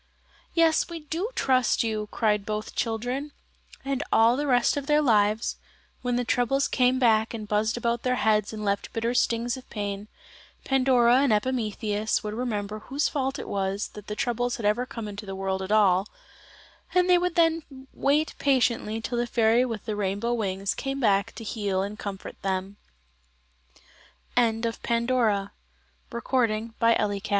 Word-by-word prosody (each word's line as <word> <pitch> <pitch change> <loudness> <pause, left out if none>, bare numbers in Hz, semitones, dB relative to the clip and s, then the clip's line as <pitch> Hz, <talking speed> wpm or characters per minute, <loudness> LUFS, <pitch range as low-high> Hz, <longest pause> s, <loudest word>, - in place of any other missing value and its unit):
"Yes, 330 -1 +3
we 335 -1 -6
do 330 +8 -3
trust 255 -3 +2
you," 215 -2 -2
cried 210 -3 +1
both 215 +1 -4
children. 245 +6 -2 0.5
And 275 0 -1
all 230 +2 +5
the 290 +2 -2
rest 245 -3 +3
of 285 -1 -4
their 300 0 +4
lives 215 -5 +2 0.4
when 245 -1 -1
the 245 0 0
troubles 245 +4 +1
came 255 0 +2
back 225 -2 +3
and 215 -2 -6
buzzed 215 +3 0
about 235 0 -1
their 250 0 +1
heads 215 -3 +2
and 215 -1 -5
left 200 0 -1
bitter 230 +1 -1
stings 240 0 +1
of 255 - -13
pain, 205 -1 -4 0.6
Pandora 255 -2 +4
and 275 -2 +3
Epimetheus 215 -2 0
would 210 0 -4
remember 215 -3 -3
whose 270 +7 -1
fault 270 -1 -2
it - - -7
was 195 +1 -2
that 210 -1 -12
the 210 - -4
troubles 245 0 -1
had 225 - -5
ever 225 +5 +1
come 230 -4 -6
into 205 0 -8
the 195 - -5
world 190 0 -2
at 190 +2 -5
all, 200 -2 +4 0.9
and 360 0 +4
they 360 -1 +5
would 360 -1 -1
then 330 -1 +3 0.3
wait 295 +3 +1
patiently 240 -5 +1
till 240 +1 -2
the 240 - 0
fairy 230 +1 +3
with 230 -5 -4
the 215 -2 -2
rainbow 205 +4 -1
wings 195 -3 -1
came 270 0 -4
back 200 -5 +2
to 225 - -8
235 Hz, 145 wpm, -26 LUFS, 210-260 Hz, 0.9 s, all